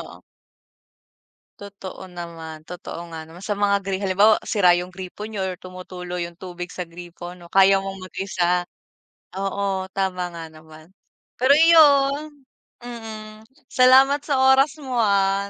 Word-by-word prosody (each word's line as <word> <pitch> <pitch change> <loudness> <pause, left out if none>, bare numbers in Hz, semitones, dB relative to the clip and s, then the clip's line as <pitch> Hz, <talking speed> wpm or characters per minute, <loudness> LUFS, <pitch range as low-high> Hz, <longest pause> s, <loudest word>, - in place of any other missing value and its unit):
oo. - - -11 1.4
Totoo 195 -2 -9
naman 165 -3 -9
totoo 170 -1 -8
nga 160 - -6
naman 175 +4 -12
sa 215 - -2
mga 200 0 +2
gri 195 -1 -1
halimbawa 200 +2 +4
sira 180 -4 +3
yung 175 +1 -1
gripo 190 +3 -8
niyo 205 -3 -4
or 185 -1 -3
tumutulo 180 -1 -8
yung 170 -1 -4
tubig 180 -1 -7
sa 180 -2 -6
gripo, 175 +1 -10
'no, 170 -1 -16
kaya 195 0 +6
mong 195 0 -5
mag-isa 180 -2 -1 0.7
oo, 195 0 -2
tama 185 -2 -2
nga 170 -1 -8
naman. 155 +2 -16 0.5
Pero 275 +3 +6
iyon, 295 -3 +4 0.4
mm, 220 -2 -9 0.2
salamat 265 +3 +5
sa 285 -3 -1 0.2
oras 270 +2 +2
mo 260 -5 -2
ah, 200 -1 +1
195 Hz, 140 wpm, -22 LUFS, 180-215 Hz, 1.4 s, kaya